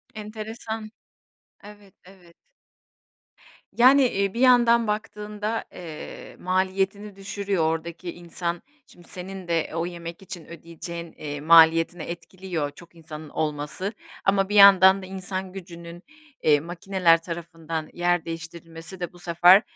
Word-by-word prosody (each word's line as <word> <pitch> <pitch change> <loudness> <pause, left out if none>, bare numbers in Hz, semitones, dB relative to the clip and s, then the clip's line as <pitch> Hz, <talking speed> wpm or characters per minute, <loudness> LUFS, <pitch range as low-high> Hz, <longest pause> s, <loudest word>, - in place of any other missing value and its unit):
Enteresan. 220 0 -6 0.7
Evet, 205 -2 -15
evet. 180 -3 -18 1.4
Yani, 265 +3 +7
eee, 200 -3 -1
bir 235 - -4
yandan 235 -3 +5
baktığında, 210 +1 -3
eee, 165 -4 -9
maliyetini 190 +2 -1
düşürüyor 195 -2 -2
ordaki 165 +2 -2
insan. 175 0 -4 0.3
Şimdi 175 -1 -18
senin 185 0 -8
de 165 -2 0
o 165 +1 -1
yemek 170 0 -7
için 175 -3 -9
ödeyeceğin, 170 0 -8
eee, 145 -1 -6
maliyetini 165 +1 +5
etkiliyor 175 -3 -5
çok 170 +2 -16
insanın 155 -2 -10
olması 155 +8 -3 0.3
ama 195 0 +2
bir 210 - -1
yandan 195 -1 +8
da - - -8
insan 185 0 -5
gücünün, 170 -2 -10 0.4
eee, 150 -2 +5
makineler 170 0 +2
tarafından 165 -2 -6
yer 175 -1 +1
değiştirilmesi 165 +2 -8
de 175 0 -5
bu 175 - -15
sefer, 175 +2 +6
175 Hz, 120 wpm, -25 LUFS, 165-195 Hz, 1.4 s, yandan